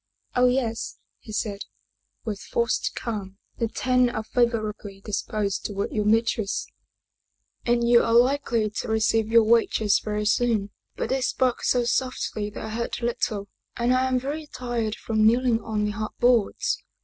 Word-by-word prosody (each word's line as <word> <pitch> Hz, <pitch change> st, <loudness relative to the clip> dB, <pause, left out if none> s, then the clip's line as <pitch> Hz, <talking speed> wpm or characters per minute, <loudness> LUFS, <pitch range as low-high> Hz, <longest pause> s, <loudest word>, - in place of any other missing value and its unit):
" -, -, -38 dB
Oh, 250 Hz, 0 st, +5 dB
yes," 245 Hz, -3 st, -1 dB, 0.2 s
he 220 Hz, -, -11 dB
said, 210 Hz, -1 st, -2 dB, 0.7 s
with 210 Hz, -3 st, -3 dB
forced 235 Hz, 0 st, -1 dB
calm. 200 Hz, -4 st, -5 dB
" -, -, -43 dB
The 230 Hz, -, +1 dB
Ten 250 Hz, +2 st, +2 dB
are 220 Hz, -2 st, -3 dB
favorably 215 Hz, -4 st, -1 dB
disposed 200 Hz, -1 st, -2 dB
toward 200 Hz, -1 st, -3 dB
your 210 Hz, -1 st, -1 dB
mistress, 220 Hz, -1 st, +1 dB, 1.0 s
and 235 Hz, 0 st, +2 dB
you 235 Hz, 0 st, +6 dB
are 230 Hz, -, +1 dB
likely 245 Hz, -3 st, +3 dB
to -, -, -4 dB
receive 220 Hz, 0 st, +2 dB
your 230 Hz, 0 st, +5 dB
wages 220 Hz, -2 st, +3 dB
very 210 Hz, 0 st, -3 dB
soon. 215 Hz, -2 st, +1 dB, 0.2 s
But -, -, -3 dB
they 265 Hz, 0 st, 0 dB
spoke 255 Hz, -1 st, +1 dB
so 245 Hz, -1 st, +2 dB
soffly 235 Hz, -4 st, -1 dB
that 205 Hz, -, -7 dB
I -, -, -5 dB
heard 235 Hz, +2 st, -3 dB
little, 220 Hz, -3 st, -1 dB, 0.3 s
and 240 Hz, +1 st, +2 dB
I 255 Hz, +1 st, +2 dB
am 255 Hz, -1 st, +1 dB
very 295 Hz, +4 st, -4 dB
tired 235 Hz, -5 st, -3 dB
from 220 Hz, -1 st, 0 dB
kneeling 235 Hz, +1 st, +3 dB
on 215 Hz, -1 st, -1 dB
the 210 Hz, -, -1 dB
hard 215 Hz, 0 st, -4 dB
boards. 240 Hz, -4 st, +2 dB
225 Hz, 165 wpm, -25 LUFS, 215-245 Hz, 1.0 s, you